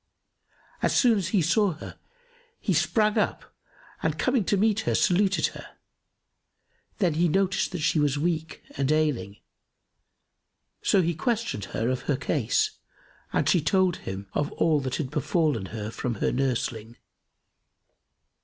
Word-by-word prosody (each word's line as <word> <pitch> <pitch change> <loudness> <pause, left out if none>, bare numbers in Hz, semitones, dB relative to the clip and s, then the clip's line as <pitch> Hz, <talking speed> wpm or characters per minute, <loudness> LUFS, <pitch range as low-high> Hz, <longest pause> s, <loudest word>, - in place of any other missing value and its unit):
As - - +1
soon 235 -5 +4
as 185 - -2
he 185 -2 +2
saw 195 +3 +2
her, 155 - -10 0.6
he 195 - 0
sprang 175 +7 +2
up - - -2 0.5
and - - -1
coming 255 -4 +1
to 200 - +2
meet 215 +1 +2
her, 220 - 0
saluted 190 +1 +2
her; - - -12 1.2
then 180 -7 +2
he 170 +3 +2
noticed 195 +4 +1
that 180 -3 -4
she 160 -1 +2
was 145 -1 +1
weak 160 0 -2
and 140 0 0
ailing; 150 -10 0 1.4
so 190 - +3
he 170 +1 0
questioned 220 - -2
her 115 +4 -2
of 130 -1 -1
her 140 - +2
case 140 -4 0 0.5
and - - 0
she 175 - +4
told 185 +3 +2
him 95 +1 -7
all 150 +1 +1
that 130 -2 -3
had 135 -5 -3
befallen 150 - 0
her 110 0 -5
from 120 0 -3
her - - 0
nursling. 120 -3 -2
160 Hz, 145 wpm, -26 LUFS, 130-190 Hz, 1.4 s, soon